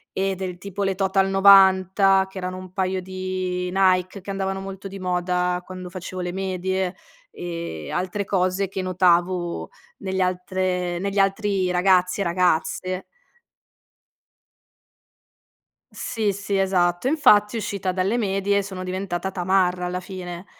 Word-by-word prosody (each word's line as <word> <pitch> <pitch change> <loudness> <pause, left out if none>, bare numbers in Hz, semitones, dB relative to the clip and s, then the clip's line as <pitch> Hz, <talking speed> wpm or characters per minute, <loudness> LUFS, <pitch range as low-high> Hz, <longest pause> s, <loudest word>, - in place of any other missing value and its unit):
eh 195 0 0
del 180 -1 -5
tipo 200 +1 -4
le 195 -1 +1
Total 195 0 +1
90, 195 0 +5
che 190 - -11
erano 185 0 -4
un 185 -1 -10
paio 185 -1 -1
di 185 -1 -3
Nike, 185 0 +2
che 200 - -11
andavano 195 0 -2
molto 195 0 -7
di 195 0 -8
moda 180 0 0
quando 185 -1 -8
facevo 185 0 -6
le 180 0 -3
medie, 190 0 -2 0.4
e 170 - -6
altre 185 +3 -2
cose 190 0 0
che 190 0 -4
notavo 175 - +1 0.3
negli 190 -1 -2
altre 180 -1 -1
negli 200 +2 -3
altri 195 -1 +1
ragazzi 180 +1 +3
e - - +2
ragazze. 180 +1 0 2.9
Sì, 215 -3 -2
sì, 200 0 -2
esatto. 180 +2 +1
Infatti 235 -8 +4
uscita 200 -3 -2
dalle 190 +5 0
medie 200 -2 +1
sono 190 -2 -6
diventata 185 0 -3
tamarra 180 -1 +1
alla 180 +1 -2
fine. 180 -1 -7
185 Hz, 130 wpm, -23 LUFS, 180-195 Hz, 2.9 s, 90